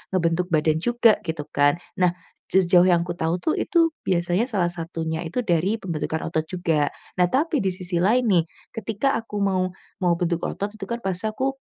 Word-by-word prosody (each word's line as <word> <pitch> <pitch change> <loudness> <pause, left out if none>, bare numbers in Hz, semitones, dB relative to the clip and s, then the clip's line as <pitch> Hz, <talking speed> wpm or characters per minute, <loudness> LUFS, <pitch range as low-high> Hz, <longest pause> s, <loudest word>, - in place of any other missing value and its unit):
ngebentuk 170 0 +1
badan 155 0 +2
juga, 235 +3 +3
gitu 160 -2 -2
kan. 145 0 +3 0.2
Nah, 180 -1 +4 0.4
sejauh 180 -1 +5
yang 170 -2 +4
aku 175 - -4
tahu 165 +2 0
tuh, - - +1
itu 330 -2 +3 0.2
biasanya 175 +4 +1
salah 185 -8 0
satunya 165 -1 -4
itu 245 +9 -2
dari 180 +1 +1
pembentukan 160 -3 -3
otot 160 -1 0
juga. 160 -4 0 0.3
Nah 180 - +5
tapi, 295 +1 +1
di 195 - +1
sisi 180 -1 -3
lain 235 +7 +3
nih, 170 -3 +4 0.3
ketika 225 +4 -1
aku 225 -2 -7
mau 185 -2 +1 0.3
mau 175 -2 +3
bentuk 170 -1 -1
otot 200 +1 -3
itu 220 - -6
kan, 235 0 -2
pasti 190 +2 -2
aku. 260 +5 -1
180 Hz, 185 wpm, -24 LUFS, 170-215 Hz, 0.4 s, sejauh